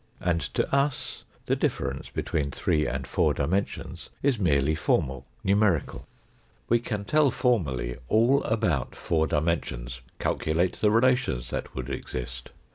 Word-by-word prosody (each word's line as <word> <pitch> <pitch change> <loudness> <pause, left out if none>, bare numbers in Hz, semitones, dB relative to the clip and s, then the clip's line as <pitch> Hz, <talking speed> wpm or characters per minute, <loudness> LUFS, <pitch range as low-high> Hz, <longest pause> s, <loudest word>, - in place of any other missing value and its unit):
And 85 -2 +1
to - - +1
us 140 0 -1 0.2
the - - +2
difference - - -2
between 75 -3 -1
three 75 +2 0
and 65 +2 -3
four - - +1
dimensions 90 +8 -2
is 135 -5 +2
merely 75 -5 +3
formal, 65 -4 0 0.2
numerical. 100 -3 +1 0.6
We 120 - +4
can 105 -3 -4
tell 150 +4 +4
formally 70 - 0
all 120 +6 +4
about 90 - 0
four 80 -1 0
dimensions, 65 -6 -1 0.2
calculate 85 +3 0
the 105 - +3
relations 115 - +2
that - - -4
would 65 +1 -4
exist. 60 -2 -5
85 Hz, 130 wpm, -27 LUFS, 65-110 Hz, 0.6 s, We